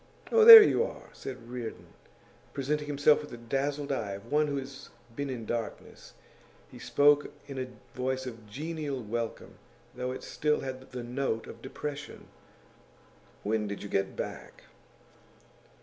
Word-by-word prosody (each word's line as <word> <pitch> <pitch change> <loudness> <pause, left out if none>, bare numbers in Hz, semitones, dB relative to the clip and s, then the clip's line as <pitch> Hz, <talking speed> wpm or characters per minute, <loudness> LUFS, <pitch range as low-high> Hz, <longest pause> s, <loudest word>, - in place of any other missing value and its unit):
'Oh, 455 -1 +6
there 450 -1 +14
you 460 - +2
are!' - - -8
said 125 -3 -8
Reardon, 120 -2 -7 0.6
presenting 145 +2 -2
himself 145 +1 +3
with 150 - -10
the 120 - -9
dazzled 140 +4 -2
eyes 100 -7 -2
of 115 +6 -15
one 150 +1 +3
who 140 -1 -2
has 135 0 -8 0.3
been 140 +1 -3
in 120 -4 -5
darkness; 115 0 -6 0.6
he - - -12
spoke 145 0 +3
in 140 -2 -7
a 130 - -3 0.3
voice 130 +1 -2
of 115 -4 -9
genial 145 +1 -4
welcome, 115 +1 -5 0.3
though 125 0 -4
it 130 - -7
still 150 0 0
had 130 0 -7
the 125 -1 -6
note 120 -2 -2
of - - -11
depression. 150 +2 -7 1.2
'When 105 0 0
did 100 0 -6
you 100 - -7
get 95 0 -1
back? - - -7
130 Hz, 150 wpm, -29 LUFS, 120-145 Hz, 1.2 s, there